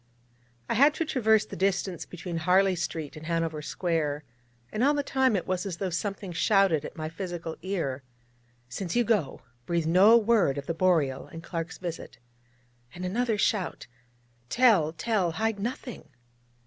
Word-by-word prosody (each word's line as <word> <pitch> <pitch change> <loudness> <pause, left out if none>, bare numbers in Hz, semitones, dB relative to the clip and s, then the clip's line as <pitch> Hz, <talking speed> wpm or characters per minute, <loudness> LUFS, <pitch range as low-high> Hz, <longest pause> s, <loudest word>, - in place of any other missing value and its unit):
I - - 0
had 285 +5 +5
to 330 - -1
traverse 220 -7 +3
the - - -9
distance 190 -2 -1
between 175 -1 -6
Harley 185 +3 +3
Street 160 -3 -4
and 155 +1 -9
Hanover 165 -2 -1
Square, 150 -3 -2 0.5
and 215 - -1
all 290 +2 +4
the 285 - 0
time 265 -4 +2
it 185 - -1
was 185 -1 -1
as 190 -5 -5
though 190 -1 -2
something 195 +2 -3
shouted 190 -4 +3
at - - -8
my 155 0 -3
physical 170 -1 -5
ear: 165 -9 -2 0.7
'Since 170 - -4
you 240 - +4
go, 210 -11 0 0.3
breathe 170 -2 0
no 190 +8 +6
word 210 - +2
of 140 - -4
the 165 - -2
Boreal, 160 -7 +1
and 165 0 -10
Clark's 165 0 -5
visit'; 170 -3 -7 0.8
and 180 +1 -5
another 225 +4 0
shout: 195 -2 0 0.6
'Tell, 215 -12 +4
tell, 185 -1 0
hide 220 +1 -1
nothing!' 240 - -5
185 Hz, 160 wpm, -27 LUFS, 165-215 Hz, 0.8 s, no